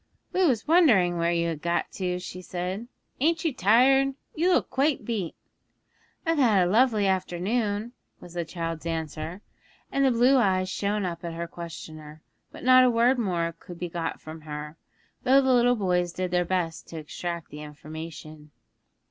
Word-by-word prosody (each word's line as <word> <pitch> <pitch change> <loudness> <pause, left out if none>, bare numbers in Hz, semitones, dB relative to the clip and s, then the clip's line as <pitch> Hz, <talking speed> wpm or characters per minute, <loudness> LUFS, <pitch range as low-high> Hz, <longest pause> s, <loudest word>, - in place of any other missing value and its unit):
'We 370 -1 +3
was 240 -4 0
wonderin' 225 - +5
where 170 0 +2
you 170 0 +1
had 155 -3 -5
got 170 0 -1
to,' 180 -2 -2
she 180 0 -7
said. 185 +5 -4 0.3
'Ain't 325 +4 +1
you 315 - +1
tired? 265 +6 +4 0.2
You 345 +4 +2
look - - +1
quite 280 +2 +1
beat.' 210 -9 -3 0.9
'I've 330 -2 +1
had 210 -9 +4
a - - -1
lovely 220 -2 +3
afternoon,' 205 +4 -1 0.3
was 175 - -12
the 175 -1 -2
child's 165 -1 -5
answer, 160 +3 -4 0.5
and 275 - +1
the 270 - +5
blue 250 +3 +4
eyes 185 -5 +2
shone 205 +1 -1
up 170 -1 -5
at 170 -1 -5
her 170 +1 -4
questioner; 155 -2 -9 0.3
but - - -11
not 255 0 +7
a 255 - +5
word 240 +2 +3
more 170 -6 -1
could 175 - -11
be 175 0 -4
got 165 -1 -4
from 155 +1 -10
her, 150 0 -7 0.5
though 265 +1 +5
the 265 -1 +3
little 245 0 +4
boys 180 -4 0
did 185 +1 -3
their 180 0 +2
best 170 -2 -2
to 165 - -8
extract 170 +1 -6
more 150 0 -7
information. 155 0 -9
180 Hz, 175 wpm, -26 LUFS, 170-240 Hz, 0.9 s, not